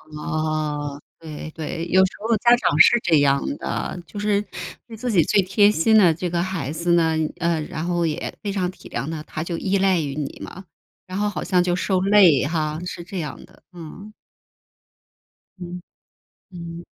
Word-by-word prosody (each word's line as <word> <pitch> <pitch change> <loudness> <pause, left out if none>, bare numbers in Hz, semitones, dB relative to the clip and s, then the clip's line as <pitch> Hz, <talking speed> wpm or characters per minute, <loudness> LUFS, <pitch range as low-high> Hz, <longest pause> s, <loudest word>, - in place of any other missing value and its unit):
哦。 150 -2 -2 0.2
对 155 -1 -8
对， 165 +2 -5
有 190 +2 +5
时 185 - -3
候 225 +2 +1
家 240 +3 +5
长 - - +1
是 240 - +7
这 160 -7 +3
样 140 -1 +3 0.2
的， - - -4
就 205 +5 -8
是 205 -1 +1 0.4
对 230 -2 -11
自 245 +3 -3
己 185 -8 +4
最 200 - +3
贴 205 +3 +4
心 220 +5 +3
的 180 -6 +6
这 175 +3 -3
个 170 0 0
孩 185 -7 -3
子 170 +3 -1
呢， 165 -2 +3 0.2
呃， 170 -2 0
然 155 +1 -5
后 175 -1 0
也 155 -2 -3
非 205 - -2
常 185 -2 -1
体 185 - -13
谅 140 - -4
他， 160 -2 -5
他 155 - -6
就 170 +1 -3
依 195 +3 0
赖 190 -3 +2
于 140 -2 -4
你 145 -2 -5
嘛， 190 +2 -10 0.4
然 185 +1 -5
后 210 +1 +1
好 205 - -5
像 180 -1 +2
就 175 0 0
受 185 0 0
累 190 -7 +5
哈， 155 0 -1
是 175 -1 -6
这 185 0 -5
样 150 -4 -6
的， - - -23
嗯。 180 +5 -10 1.5
嗯。 180 0 -7 0.7
嗯。 170 -1 -8
175 Hz, 200 characters per minute, -22 LUFS, 155-195 Hz, 1.5 s, 是